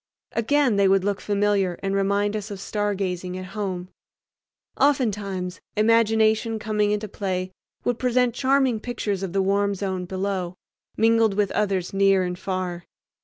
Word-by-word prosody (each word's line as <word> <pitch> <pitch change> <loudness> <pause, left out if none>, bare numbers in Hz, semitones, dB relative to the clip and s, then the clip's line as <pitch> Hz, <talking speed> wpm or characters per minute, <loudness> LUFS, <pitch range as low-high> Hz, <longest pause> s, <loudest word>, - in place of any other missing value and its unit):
Again 250 0 +2
they 200 -1 +4
would 190 0 +3
look 200 0 -1
familiar 200 -3 +1
and 195 0 -1
remind 200 +1 +1
us 210 0 -4
of 200 - -6
stargazing 190 -3 -2
at 185 - -6
home. 185 -4 -3 0.9
Oftentimes 205 -10 0 0.2
imagination 220 0 +3
coming 210 -1 0
into 210 +1 -1
play 185 -2 -3 0.3
would 245 -1 -1
present 250 -1 +2
charming 265 -2 +2
pictures 210 -4 -3
of 190 -3 -3
the 195 +1 +1
warm 200 +1 +1
zone 190 -2 -3
below, 185 -1 -3 0.4
mingled 225 -2 +3
with 205 -1 +1
others 195 -4 -1
near 195 -1 +4
and 180 0 -4
far. 185 -2 -3
200 Hz, 145 wpm, -24 LUFS, 190-220 Hz, 0.9 s, they